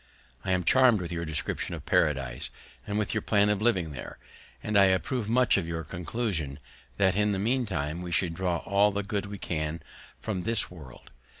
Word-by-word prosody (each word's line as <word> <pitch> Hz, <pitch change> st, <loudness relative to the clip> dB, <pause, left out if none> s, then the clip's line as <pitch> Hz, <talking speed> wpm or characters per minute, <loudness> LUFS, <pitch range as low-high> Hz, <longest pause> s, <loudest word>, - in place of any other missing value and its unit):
I 95 Hz, -, -4 dB
am 90 Hz, -1 st, +2 dB
charmed 125 Hz, 0 st, +5 dB
with 90 Hz, -1 st, -5 dB
your 85 Hz, 0 st, -3 dB
description 80 Hz, -2 st, -1 dB
of -, -, -10 dB
Paradise, 70 Hz, -5 st, +1 dB, 0.4 s
and 105 Hz, -, -2 dB
with 105 Hz, -2 st, 0 dB
your 110 Hz, -, 0 dB
plan 105 Hz, -1 st, +3 dB
of 105 Hz, -1 st, +1 dB
living 95 Hz, -9 st, +2 dB
there; 65 Hz, -4 st, -8 dB, 0.5 s
and 105 Hz, -, -2 dB
I 100 Hz, -1 st, +7 dB
approve 105 Hz, +5 st, 0 dB
much 125 Hz, -1 st, +4 dB
of 90 Hz, -4 st, -1 dB
your 80 Hz, -1 st, -3 dB
conclusion, 85 Hz, -, -3 dB, 0.4 s
that, 95 Hz, -2 st, +3 dB
in 105 Hz, 0 st, +2 dB
the -, -, -1 dB
meantime, 95 Hz, -, -1 dB
we 90 Hz, -1 st, -6 dB
should 85 Hz, +1 st, +1 dB
draw 90 Hz, -1 st, -1 dB
all 100 Hz, +1 st, +3 dB
the 100 Hz, +1 st, -2 dB
good 100 Hz, 0 st, -3 dB
we 100 Hz, 0 st, -6 dB
can 80 Hz, -2 st, -3 dB, 0.4 s
from 100 Hz, -5 st, -3 dB
this 115 Hz, 0 st, +2 dB
world. 75 Hz, -8 st, -13 dB
95 Hz, 195 wpm, -28 LUFS, 80-105 Hz, 0.5 s, I